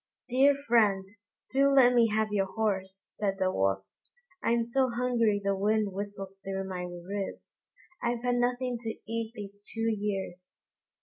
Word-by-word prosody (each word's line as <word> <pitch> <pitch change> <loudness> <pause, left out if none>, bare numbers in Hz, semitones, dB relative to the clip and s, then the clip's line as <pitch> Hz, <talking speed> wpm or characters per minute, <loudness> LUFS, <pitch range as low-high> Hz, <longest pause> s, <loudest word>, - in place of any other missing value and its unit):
"Dear 270 +3 +5
friend, 210 -5 +4 0.5
do 275 +1 +4
let 255 -3 +6
me 235 -2 +5
have 215 0 +1
your 195 -2 +1
horse," 190 -2 -2
said 200 -2 -2
the 185 -1 +1
Wolf; 95 - 0 0.6
"I'm 235 0 +2
so 255 +3 +1
hungry 235 -3 +1
the 200 0 +1
wind 210 +1 +1
whistles 195 -1 -6
through 195 0 -3
my 180 -1 -4
ribs; 180 +3 -6 0.4
I've 235 0 -1
had 245 0 +2
nothing 245 0 0
to 225 -1 -5
eat 230 0 -3
these 200 -1 -9
two 225 0 +1
years." 195 -3 -4
210 Hz, 150 wpm, -29 LUFS, 195-235 Hz, 0.6 s, let